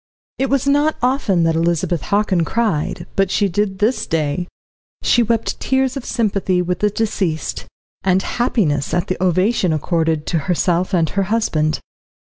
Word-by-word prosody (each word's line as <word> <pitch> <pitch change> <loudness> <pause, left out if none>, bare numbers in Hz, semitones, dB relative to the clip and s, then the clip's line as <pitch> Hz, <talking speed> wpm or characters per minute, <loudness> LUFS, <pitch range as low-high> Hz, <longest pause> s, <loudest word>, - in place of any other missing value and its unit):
It 270 0 +1
was 275 0 +1
not 290 +2 +2
often 250 -9 +2
that 165 0 +2
Elizabeth 170 0 0
Hockin 200 -4 +1
cried, 170 -5 -1
but 195 -1 +2
she 200 +1 +2
did 195 +1 -1
this 215 +6 0
day; 160 +2 -1 0.6
she 240 - +4
wept 230 -1 0
tears 265 0 0
of 275 - -5
sympathy 195 -5 0
with 180 0 -1
the 210 - +2
deceased, 195 -7 -2 0.4
and 190 0 +2
happiness 170 - 0
at 175 - -1
the 185 0 -2
ovation 185 +1 +2
accorded 160 0 0
to 165 - 0
herself 180 +2 +1
and 165 -2 +2
her 200 - 0
husband. 155 -9 0
185 Hz, 155 wpm, -19 LUFS, 170-225 Hz, 0.6 s, she